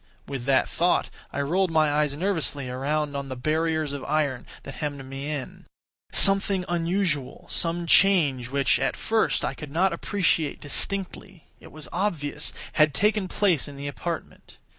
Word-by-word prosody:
With 135 -3 -5
that 135 -1 +3
thought 175 +1 +1 0.2
I 140 - -2
rolled 180 +6 +1
my 155 -2 +3
eves 145 -2 -2
nervously 155 -7 -1
around 145 +3 -2
on 140 -1 -4
the 130 - -4
barriers 155 +2 0
of 140 - -5
iron 145 -4 -1 0.2
that 135 - -8
hemmed 145 -3 -4
me 135 +2 -6
in. 145 -4 -6 0.4
Something 195 -1 +4
unusual—some 170 -1 -1
change 155 -10 +4
which, 140 0 +2
at - - -1
first, 225 0 +1
I - - -2
could 150 - -9
not 175 +5 +1
appreciate 170 -4 0
distinctly—it 190 +3 -4
was 155 -1 -8
obvious, 160 -6 -1 0.2
had 155 -2 +3
taken 210 -1 +2
place 180 -7 +1
in 140 -1 -10
the 140 +1 -5
apartment. 165 +4 -6
155 Hz, 150 wpm, -25 LUFS, 140-180 Hz, 0.4 s, Something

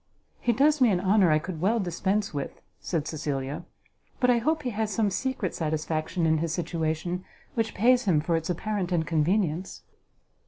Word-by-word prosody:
"He 240 - +2
does 285 +5 +3
me 250 - +6
an 185 -4 +2
honour 190 0 +4
I 155 - +5
could 160 0 -5
well 220 +5 +2
dispense 195 +2 -1
with," 140 -1 -4 0.2
said 160 -4 -2
Cecilia; 145 0 -3 0.5
"but 250 -1 +4
I 240 - +3
hope 310 +6 0
he 250 - -1
has 220 0 -1
some 205 0 +1
secret 250 -3 -2
satisfaction 155 +1 -1
in 160 -1 +3
his 165 0 -1
situation 170 +1 -2 0.3
which 225 -1 -1
pays 245 +4 +4
him 175 -6 +3
for 165 +3 0
its 165 +1 -2
apparent 190 +1 -2
inconvenience." 170 +2 0
180 Hz, 170 wpm, -27 LUFS, 160-215 Hz, 0.5 s, me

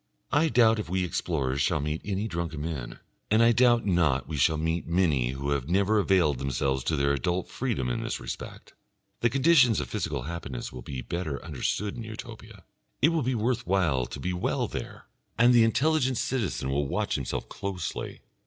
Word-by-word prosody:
I 155 +3 +3
doubt 115 -4 +4
if 105 - -5
we 95 0 0
explorers 70 -6 -1
shall 80 +1 +2
meet 75 +2 -2
any 100 +1 -2
drunken 85 -5 -4
men, 70 -7 -5 0.3
and 110 +2 +4
I 115 - +6
doubt 120 -1 +4
not 80 -9 +2
we 80 - -4
shall 75 +3 +3
meet 80 +2 -1
many 80 -8 +1
who 70 +2 -3
have 70 0 -1
never 100 +4 +3
availed 90 -9 +2
themselves 65 0 -1
of 80 - 0
their 70 0 +2
adult 85 +7 -1
freedom 115 - -2
in - - -1
this - - -3
respect. - - -8 0.5
The 120 - +2
conditions 135 - +4
of 70 -4 -4
physical 70 -4 -2
happiness 70 -6 -6
will 65 - -7
be 65 0 -6
better 75 0 -3
understood 105 -1 -2
in 115 - -5
Utopia, 110 -2 -10 0.4
it 150 - +5
will 165 -2 +1
be 130 0 0
worth 115 -1 -1
while 85 -10 +1
to - - -8
be 90 - -2
well 90 - -1
there, - - -7 0.3
and 120 +1 +6
the 120 -2 +6
intelligent 130 +2 +2
citizen 105 - -1
will 70 +1 0
watch - - -1
himself - - -3
closely. 95 -4 -5
90 Hz, 190 wpm, -27 LUFS, 70-115 Hz, 0.5 s, I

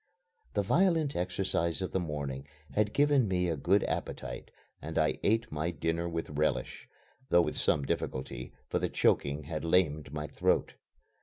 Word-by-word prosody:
The 100 - +2
violent 165 - +2
exercise 90 -2 0
of 95 - -3
the 95 - +1
morning 70 -4 -4 0.2
had 105 0 +1
given 145 -4 +3
me 90 -1 +1
a 85 - 0
good 90 +7 +3
appetite - - -4 0.3
and 80 +1 -5
I 75 -1 +2
ate 110 +2 +1
my 75 +3 -1
dinner 85 +1 -1
with 80 -2 -4
relish, 75 +1 -1 0.4
though 85 0 +6
with - - -2
some 70 -2 +2
difficulty, 65 -1 -3 0.2
for - - 0
the - - -1
choking 70 +2 +1
had 75 +2 -4
lamed 80 -5 +2
my 75 0 -3
throat. - - +1
85 Hz, 160 wpm, -31 LUFS, 75-95 Hz, 0.4 s, though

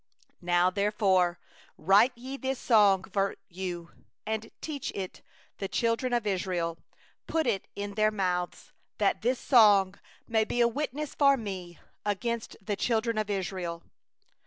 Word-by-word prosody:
19Now 175 +1 +3
therefore 195 -4 +2 0.4
write 205 +8 +4
ye 260 +3 -6
this 265 -1 -2
song 205 -6 +4
for 195 -1 +1
you, 175 -2 -5 0.3
and 220 0 -3
teach 290 -4 -4
thou 195 - -4
it 185 - -8 0.4
the 195 - -2
children 230 +4 0
of 240 -2 0
Israel; 180 -4 -1 0.5
put 320 -1 0
it 210 -6 -1
in 200 0 -4
their 215 +1 +3
mouths, 180 -4 -2 0.3
that - - +1
this 245 +3 +1
song 205 -6 +5 0.3
may 220 -1 +2
be 240 - -3
a 235 - +6
witness 290 +3 -3
for 275 -1 +4
Me 185 -6 -6 0.3
against 230 +3 -2
the 205 0 -3
children 230 0 0
of 215 -1 -2
Israel. 185 -4 -3
205 Hz, 145 wpm, -29 LUFS, 185-235 Hz, 0.5 s, a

